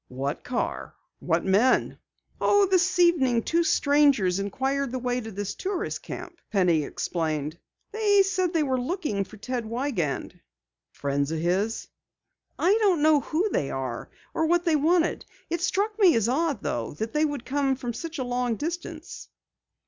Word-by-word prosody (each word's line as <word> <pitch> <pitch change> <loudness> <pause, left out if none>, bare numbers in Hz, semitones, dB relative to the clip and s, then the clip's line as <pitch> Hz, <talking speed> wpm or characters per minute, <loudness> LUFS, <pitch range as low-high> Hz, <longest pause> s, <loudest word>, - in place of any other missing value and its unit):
"What 135 +3 -4
car? 250 -1 -3 0.2
What - - 0
men?" 205 +7 +2 0.4
"Oh, 405 0 +4
this 370 -1 +2
evening 270 -10 +3
two 340 +1 +1
strangers 285 - +3
inquired 265 +7 -1
the 260 - -2
way 250 0 -1
to 225 - -7
this 205 -1 -4
tourist 390 +1 -3
camp," 350 -1 -8
Penny 180 -6 +3
explained 155 0 -3 0.3
briefly. 430 -2 +2
"They 395 - +7
said 370 -2 0
they 325 -3 +1
were 260 -3 0
looking 280 - -2
for 215 +3 -13
Ted 245 +3 -3
Wiegand." 225 - -2 0.5
"Friends 140 +1 -1
of 160 - -1
his?" 185 +7 -1 0.7
"I 385 +4 +3
don't 370 -8 +3
know 310 -1 +5
who 335 +9 -1
they 135 - -1
were 130 -3 -4 0.2
or 320 - +1
what 345 +2 +2
they 330 -2 +3
wanted. 330 +3 +2 0.3
It 340 0 -1
struck 410 +4 0
me 370 -5 +6
as 225 -1 +2
odd 290 +3 0
though, 115 +3 -3
that 220 +7 -4
they 300 0 +2
would 290 -5 -2
come 275 0 +1
from 245 -2 -5
such 330 +7 -6
a 260 - -1
long 245 -1 -1
distance." 330 +3 -6
265 Hz, 165 wpm, -26 LUFS, 205-340 Hz, 0.7 s, They